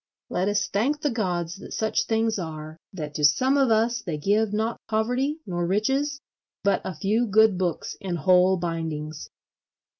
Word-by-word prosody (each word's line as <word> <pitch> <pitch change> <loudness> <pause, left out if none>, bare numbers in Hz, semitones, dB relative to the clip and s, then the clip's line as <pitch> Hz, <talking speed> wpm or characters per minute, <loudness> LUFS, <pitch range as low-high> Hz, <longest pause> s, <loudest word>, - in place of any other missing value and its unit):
Let 185 +2 0
us 205 -2 +1
thank 275 +9 0
the 295 - 0
gods 175 -6 -2
that 200 - -9
such 220 0 0
things 225 -1 +1
are: 155 -2 -6 0.2
that 150 -5 -6
to 150 - -4
some 255 - +4
of 270 -3 +3
us 225 +1 +2
they 170 -6 -4
give 205 +7 +1
not 220 +2 -2
poverty 250 +7 0
nor 175 -2 -2
riches 270 +9 0 0.4
but 200 0 +2
a 185 - -5
few 215 +8 +1
good 220 0 +5
books 180 -3 -2
in 185 -3 -3
whole 185 +2 +4
bindings. 160 -3 -4
200 Hz, 170 wpm, -25 LUFS, 175-225 Hz, 0.4 s, good